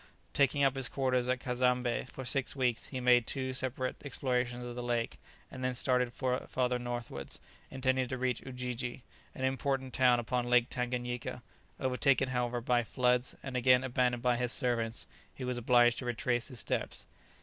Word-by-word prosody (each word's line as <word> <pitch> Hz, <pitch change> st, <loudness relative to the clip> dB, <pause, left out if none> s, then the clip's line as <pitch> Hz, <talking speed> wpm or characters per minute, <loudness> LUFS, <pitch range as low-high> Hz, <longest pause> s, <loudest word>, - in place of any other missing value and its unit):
Taking 140 Hz, 0 st, +3 dB
up 135 Hz, -1 st, +3 dB
his 135 Hz, -1 st, -2 dB
quarters 125 Hz, -2 st, +1 dB
at 125 Hz, 0 st, +1 dB
Cazembé 125 Hz, -1 st, 0 dB
for 130 Hz, -, -7 dB
six 135 Hz, +2 st, +1 dB
weeks, 125 Hz, -4 st, 0 dB
he 130 Hz, -, -5 dB
made 125 Hz, -2 st, +4 dB
two 130 Hz, -1 st, -1 dB
separate 130 Hz, 0 st, -2 dB
explorations 125 Hz, -3 st, -1 dB
of 120 Hz, -, -5 dB
the 125 Hz, -, -5 dB
lake, 120 Hz, -1 st, -1 dB, 0.3 s
and 130 Hz, -, -7 dB
then 130 Hz, 0 st, 0 dB
started 125 Hz, -1 st, +2 dB
farther 125 Hz, 0 st, -1 dB
northwards, 120 Hz, -, -5 dB, 0.3 s
intending 130 Hz, -1 st, 0 dB
to 130 Hz, -, -3 dB
reach 125 Hz, -1 st, -1 dB
Ujiji, 125 Hz, -1 st, -4 dB, 0.3 s
an 130 Hz, -, -5 dB
important 130 Hz, 0 st, -1 dB
town 125 Hz, -2 st, +4 dB
upon 120 Hz, +1 st, -1 dB
Lake 125 Hz, 0 st, +4 dB
Tanganyika; 125 Hz, -1 st, -3 dB, 0.4 s
overtaken, 130 Hz, 0 st, +2 dB
however, 125 Hz, -1 st, -1 dB
by 120 Hz, 0 st, +2 dB
floods, 125 Hz, +2 st, +1 dB
and 135 Hz, -2 st, -6 dB
again 125 Hz, 0 st, +5 dB
abandoned 125 Hz, -2 st, +1 dB
by 125 Hz, -1 st, +3 dB
his 125 Hz, 0 st, -1 dB
servants, 115 Hz, -3 st, 0 dB, 0.3 s
he 130 Hz, -, -7 dB
was 125 Hz, -1 st, -2 dB
obliged 120 Hz, 0 st, +4 dB
to 130 Hz, -, -6 dB
retrace 120 Hz, -1 st, -1 dB
his 125 Hz, -, -6 dB
steps. -, -, -2 dB
125 Hz, 170 wpm, -32 LUFS, 120-130 Hz, 0.4 s, again